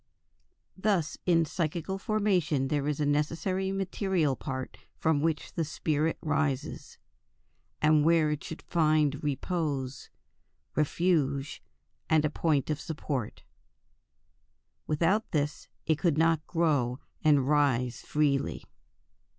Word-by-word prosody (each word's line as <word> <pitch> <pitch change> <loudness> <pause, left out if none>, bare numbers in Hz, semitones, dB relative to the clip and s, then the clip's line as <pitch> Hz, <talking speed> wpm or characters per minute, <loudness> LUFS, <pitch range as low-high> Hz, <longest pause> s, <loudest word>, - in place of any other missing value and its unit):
Thus 190 -6 0
in 165 -2 +4
psychical 170 +4 -2
formation 180 -11 +1
there 145 -1 0
is 150 -1 -1
a 150 - +1
necessary 165 +6 0
material 190 -6 0
part 130 -1 -6 0.2
from 160 -3 +1
which 160 -1 -1
the 165 - -1
spirit 155 +1 -1
rises, 145 -3 -2 0.9
and 150 -1 +5
where 160 -1 +4
it 150 +3 -3
should 160 - -8
find 155 -3 +2
repose, 145 -3 -2 0.7
refuge, 145 -3 0 0.5
and 155 -1 +4
a 150 - 0
point 155 -3 +1
of 150 - -2
support, 145 -6 -4 1.4
Without 170 +8 +1
this 150 -2 -2 0.2
it 155 -2 +1
could 160 -2 +2
not 165 -1 +2
grow 145 -8 +1 0.3
and 145 -4 +4
rise 130 -5 +2
"freely." 140 -2 0
155 Hz, 110 wpm, -29 LUFS, 145-165 Hz, 1.4 s, and